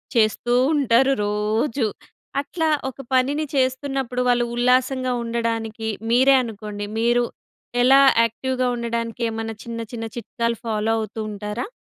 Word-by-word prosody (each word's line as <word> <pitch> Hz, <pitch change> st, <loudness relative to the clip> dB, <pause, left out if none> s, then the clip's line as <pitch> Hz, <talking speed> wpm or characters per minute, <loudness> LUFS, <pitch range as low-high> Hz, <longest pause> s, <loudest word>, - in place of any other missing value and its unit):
చేస్తూ 230 Hz, +2 st, +2 dB, 0.2 s
ఉంటారు 270 Hz, -1 st, +3 dB
రోజు. 215 Hz, +4 st, 0 dB, 0.5 s
అట్లా 320 Hz, +2 st, -1 dB, 0.2 s
ఒక 265 Hz, -, -14 dB, 0.2 s
పనిని 285 Hz, +4 st, +2 dB
చేస్తున్నప్పుడు 260 Hz, -1 st, 0 dB
వాళ్ళు 240 Hz, 0 st, +3 dB
ఉల్లాసంగా 255 Hz, +1 st, +2 dB
ఉండడానికి 225 Hz, -1 st, -2 dB, 0.2 s
మీరే 260 Hz, +3 st, +6 dB
అనుకోండి 210 Hz, -2 st, -6 dB
మీరు 240 Hz, +1 st, +3 dB, 0.6 s
ఎలా 270 Hz, +2 st, +7 dB, 0.2 s
యాక్టివ్‍గా 255 Hz, +3 st, -1 dB
ఉండడానికి 235 Hz, 0 st, -3 dB
ఏమన్నా 225 Hz, 0 st, -4 dB
చిన్న, 230 Hz, -1 st, -5 dB
చిన్న 225 Hz, -1 st, -4 dB
చిట్కాలు 235 Hz, -1 st, -2 dB
ఫాలో 220 Hz, 0 st, 0 dB
అవుతూ 220 Hz, 0 st, -5 dB
ఉంటారా? 210 Hz, -, -4 dB
235 Hz, 115 wpm, -22 LUFS, 225-255 Hz, 0.6 s, ఎలా